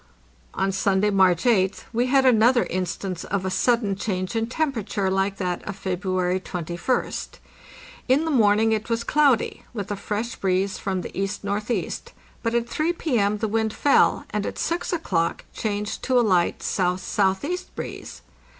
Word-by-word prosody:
On 195 - +1
Sunday, 195 +1 +2
March 185 -3 +4
8th, 200 -6 +2
we 240 +2 +1
had 270 +1 +4
another 240 0 +5
instance 185 0 -3
of 195 -1 -2
a 190 - -1
sudden 215 0 +2
change 185 0 -3
in 225 0 0
temperature 230 -8 -1
like 195 +1 0
that 180 -2 -2
of 205 - -4
February 185 -1 -1
21st. 175 +6 -3 0.7
In 275 +5 +3
the 320 - 0
morn 210 -6 +4
ing 225 0 +3
it 220 +1 -1
was 230 0 0
cloudy, 285 -5 +2
with 205 -2 -4
a - - 0
fresh 210 +4 -3
breeze 190 +1 0
from 190 -2 -2
the - - -8
E.N.E., 205 +3 -2 0.5
but 230 0 -1
at 235 0 +1
3 310 +7 0
P.M. 220 -11 +1
the 220 - -1
wind 220 0 0
fell, 285 - +3
and - - -1
at - - -5
6 340 +1 -1
o'clock 185 - -1
changed 210 -1 -3
to 255 -1 +2
a 240 - +3
light 180 -4 +3
S.S.E. 190 - 0 0.2
breeze. - - -7
205 Hz, 160 wpm, -24 LUFS, 190-235 Hz, 0.7 s, another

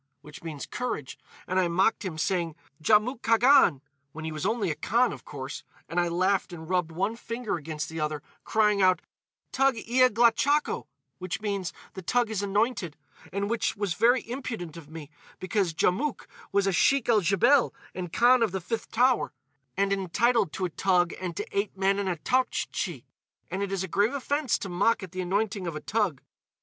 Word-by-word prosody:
which 150 0 -12
means, 155 -4 -6
'Courage,' 240 - -4 0.3
and 185 +1 0
I 180 - +3
mocked 190 +7 +2
him, 180 -5 -4
saying, 170 -1 -1 0.3
'Djamouk 220 - +3
Khagan,' 230 - +5 0.3
when 160 0 -7
he 160 - -3
was 155 +4 -2
only 215 -5 0
a - - -3
Khan, 240 +8 +2
of - - -11
course; 140 -1 -7 0.2
and 175 - -1
I 175 - +2
laughed 185 +3 +1
and 160 -2 -8
rubbed 180 -2 0
one 195 +7 -1
finger 230 -1 -4
against 155 -1 -5
the 160 0 -6
other, 150 -1 -2 0.2
crying 210 -2 +2
out, 185 -2 +4 0.5
'Toug 270 -1 +3
ia 255 +2 +5
glachakho!' 240 +6 +2 0.3
which 185 -1 -4
means, 200 -4 -2 0.2
'The 190 - -7
toug 240 +5 +1
is 205 -3 -1
anointed.' 200 - 0 0.3
And 200 +1 -1
which 230 -1 -1
was 200 -3 -1
very 240 +7 +3
impudent 230 - -5
of 160 -3 -11
me, 155 -2 -9 0.3
because 190 -2 0
Djamouk 190 - 0 0.3
was 200 0 +2
a 195 - +2
Sheik 270 +8 +3
el 225 -3 +4
Djebel 230 +9 +4 0.2
and 180 -2 -5
Khan 245 +4 +5
of 225 -4 +2
the 190 - -1
Fifth 220 +6 -4
Tower, 245 - +2 0.4
and 200 0 +2
entitled 200 +1 +1
to 190 - -2
a 175 - -3
toug 180 0 +2
and 175 -3 -4
to - - -2
eight 200 -1 -1
men 195 +1 +2
and 200 -2 -1
a 180 - 0
Toughtchi. 255 +10 -1 0.5
And 190 - -2
it 200 -1 -2
is 195 -1 -1
a - - -3
grave 205 +9 +1
offence 285 -1 0
to - - -6
mock 195 +4 +1
at 185 - -8
the 185 0 -4
anointing 200 +1 -1
of 165 - -4
a - - -3
toug." 205 - -1
195 Hz, 190 wpm, -27 LUFS, 175-230 Hz, 0.5 s, Khagan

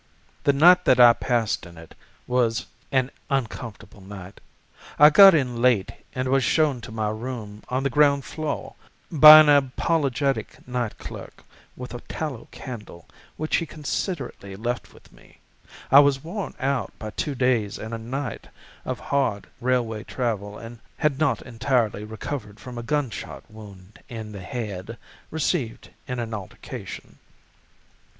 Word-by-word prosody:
"The 140 - +6
night 180 +6 +6
that 125 - +4
I 120 -1 +9
passed 115 -8 -1
in 85 -1 -15
it 80 -1 -13 0.3
was 120 -3 0 0.3
an 130 -1 +1 0.2
uncomfortable 120 -6 -4
night. 95 0 -11 0.6
I 150 +1 +8
got 195 +2 +9
in 125 -5 -1
late 120 -6 +3 0.2
and 130 0 -1
was 135 0 +2
shown 145 -2 +2
to 115 - -9
my 110 -1 -2
room 110 -2 -6
on 130 +1 -1
the 140 - +1
ground 140 0 +3
floor 155 -2 -4 0.4
by 155 -1 +11
an 155 - +3
apologetic 140 -1 +1
night 125 -3 -3
clerk - - -10 0.3
with 125 -1 -8
a 120 - -5
tallow 150 -7 -6
candle, 105 -9 -10 0.3
which 155 0 0
he 165 - -3
considerately 145 - -5
left 120 +4 -4
with - - -20
me. - - -21 0.5
I 135 - +10
was 140 -2 +3
worn 190 +5 -5
out 135 -6 -2
by 110 -1 -7
two 145 +5 -3
days 120 -6 +1
and 110 +1 -7
a 115 - -4
night 125 +2 -5 0.4
of - - -4
hard 130 -8 -1
railway 120 -3 -1
travel 105 -5 -3
and 115 0 -10 0.2
had 150 -3 0
not 155 -3 +1
entirely 115 -4 -1
recovered 110 0 -6
from 125 -2 -8
a - - -4
gunshot 135 -1 -3
wound 100 -2 -13
in 110 -2 -7
the 100 -2 -8
head, 105 +1 -6 0.3
received 150 -6 -2 0.2
in 125 - -4
an 115 -2 -4
altercation. 100 -4 -8
125 Hz, 150 wpm, -24 LUFS, 110-140 Hz, 0.6 s, by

